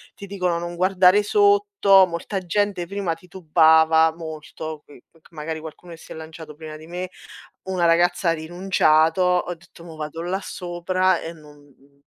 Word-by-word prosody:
ti 200 - -10
dicono: 180 -3 -1
"Non 175 0 -6
guardare 185 +2 +4
sotto", 405 - +4
molta 175 +4 -4
gente 185 -1 -1
prima 195 -3 -2
titubava 160 -2 +3
molto, 155 -1 -8
mhmm, 145 - -15
perchè 165 -1 -24
magari 160 0 -5
qualcuno 160 +2 -11
si - - -16
è - - -11
lanciato 160 -1 -10
prima 155 -1 -9
di 155 - -13
me, 180 +1 -5 0.5
una 185 -2 -1
ragazza 175 +1 +2
ha - - +4
rinunciato. 165 0 +1
Ho 180 -1 +1
detto: 170 0 -18
"Mo 165 -2 -11
vado 155 +1 -6
là 185 +3 -2
sopra 185 +1 -1
e 165 - -6
non 150 -3 -16
MHMM, 140 0 -25
170 Hz, 165 wpm, -22 LUFS, 160-185 Hz, 0.5 s, guardare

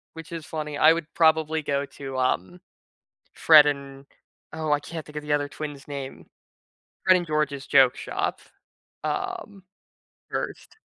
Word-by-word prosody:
Which 165 +1 -10
is 165 -2 -6
funny. 150 -2 -5
I 155 +1 +7
would 165 -1 -3
probably 160 -1 +3
go 140 -1 -1
to, 135 -1 -7
um, 90 -8 -1 0.7
Fred 155 -2 +7
and- 140 -1 -4 0.5
Oh, 155 -1 -2
I 145 - +3
can't 160 +1 -7
think 150 - -12
of 150 - -3
the 150 0 -3
other 145 -1 +1
twin's 145 -2 -7
name- 140 -2 -7 0.8
Fred 185 0 +6
and 175 -1 -2
George's 150 -3 -1
joke 135 -2 +5
shop, - - -3 0.6
um, 365 - -4 0.7
1st. - - -5
150 Hz, 150 wpm, -25 LUFS, 140-160 Hz, 0.8 s, I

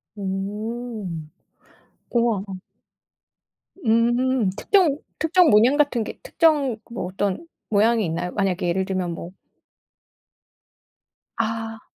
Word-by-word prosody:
오. 210 +3 -4 1.1
우와. 235 -4 +2 1.4
음 240 0 +3
특정 355 - +3 0.2
특정 335 +1 +4
문양 235 +7 +5
같은 280 -6 +2
게 - - -8
특정 300 - +2
뭐 235 -4 -4
어떤 190 - -2 0.2
모양이 220 +1 +3
있나요? 175 +2 -2
만약에 190 -3 0
예를 190 +2 0
들면 185 -2 -2
뭐 170 +1 -7 2.1
아. 225 0 -3
225 Hz, 165 characters per minute, -23 LUFS, 195-245 Hz, 2.1 s, 문양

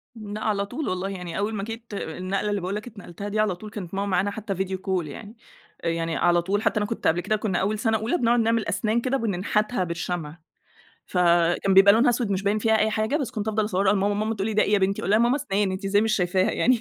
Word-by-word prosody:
لأ 215 -1 -7
على 200 -2 0
طول 255 +6 -4
والله. 185 +1 -2
يعني 180 -3 -6
أول 210 +2 -1
ما 200 - -3
جيت 225 0 -8
النقلة 190 +3 -3
اللي 205 -2 -1
باقول 185 +3 -3
لك 215 +3 -5
اتنقلتها 200 -3 -8
دي 215 +1 -2
على 210 -4 +2
طول، 215 +4 -10
كانت 195 -4 -8
ماما 200 +1 -1
معانا 195 +2 +1
حتّى 200 -2 -4
فيديو 190 0 -2
كول 185 -4 -2
يعني. 210 +9 -9 0.5
يعني 165 0 -1
على 175 0 +3
طول، 200 +4 -1
حتّى - - +1
أنا 210 - +1
كنت 225 - -2
قبل 170 +2 +2
كده 215 - 0
كُنّا 205 -4 -1
أول 205 +2 -1
سَنة 220 -1 +1
أولى 225 - -1
بنقعد 240 -2 +2
نعمل 230 0 +1
أسنان 225 +1 0
كده 270 +2 0
وبننحتها 210 0 0
بالشمع. 170 -2 -4 0.7
فكان 175 +1 +2
بيبقى 195 +1 +8
لونها 240 +3 +4
اسود 235 -3 -1
مش 195 0 0
باين 205 +2 +1
فيها 220 +1 +2
أي 220 0 +2
حاجة، 220 +7 0
بس 275 -7 -2
كنت 215 0 -4
أفضل 215 0 +1
أصوّرها 195 -1 +2
لماما، 205 0 +1
ماما 215 +2 -1
تقول 195 0 -2
لي: 215 - -2
"ده 210 - +4
إيه 210 - 0
يا 205 - +5
بنتي؟" 195 +1 0
أقول - - -2
لها: 215 - +5
"يا - - +3
ماما 245 +4 +3
اسنان 205 -9 -1
أنتِ 190 +2 -5
إزاي 205 +1 +3
مش 220 -1 +1
شايفاها 185 0 +1
يعني؟" 245 -2 +2
205 Hz, 255 wpm, -25 LUFS, 190-220 Hz, 0.7 s, بيبقى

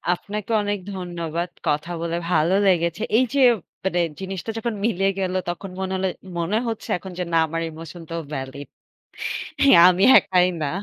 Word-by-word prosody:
আপনাকে 210 +5 -6
অনেক 205 -1 -2 0.2
ধন্যবাদ। 175 -1 -4 0.2
কথা 150 +4 0
বলে 170 0 -2
ভালো 160 +3 +3
লেগেছে। 170 +1 +1 0.2
এই 255 - +4
যে 280 - +1 0.4
মানে 180 -2 0 0.2
জিনিসটা 190 +2 -5
যখন 230 0 -2
মিলে 195 -3 +1
গেল 185 -1 -1 0.2
তখন 185 +2 -5
মনে 190 0 -2
হল 190 - -1 0.3
মনে 175 +6 0
হচ্ছে 225 -2 -5
এখন 185 +1 -9
যে - - 0
না - - +4
আমার 165 +1 -3
ইমোশনটাও 165 +1 -7
ভ্যালিড। 135 +1 -6 1.0
হ্যাঁ, 270 -11 +7
আমি 185 +2 +2
একাই 180 -1 +3 0.2
না 145 - 0
180 Hz, 160 wpm, -23 LUFS, 165-195 Hz, 1.0 s, হ্যাঁ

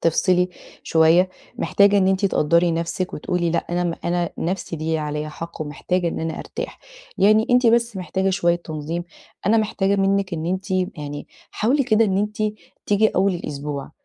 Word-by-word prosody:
تفصِلي 180 +2 +2 0.3
شوية، 165 +3 +4 0.3
محتاجة 200 -3 +4
إن 190 - +3
أنتِ 190 +1 +1
تقدّري 170 0 +3
نفسِك 170 +2 -2
وتقولي: 175 +2 -1
"لأ 170 - +1
أنا 175 0 0
م 170 -1 -1
أنا 175 -1 0
نَفسي 175 0 -3
دي 155 - -6
ليها 160 0 0
عليَّ 150 0 -3
حق 165 +1 -8
ومحتاجة 170 +4 -1
إن - - -4
أنا 160 0 -3
أرتاح." - - -6 0.4
يعني 215 +3 +5
أنتِ 250 0 +4
بس 235 -1 +3
محتاجة 190 +1 -1
شوية 175 -2 +2
تنظيم، 165 0 -5 0.4
أنا 215 +3 +4
محتاجة 200 -2 +1
منِك 195 -1 +1
إن 160 0 -4
أنتِ 190 +3 -3
يعني 155 -6 -3 0.2
حاولي 260 +6 +1
كده 225 -2 +4
إن 195 -2 +1
أنتِ 210 +1 -2 0.5
تيجي 210 +1 +4
أول 195 -1 +1
الأسبوع 145 -4 -5
180 Hz, 170 wpm, -22 LUFS, 165-200 Hz, 0.5 s, يعني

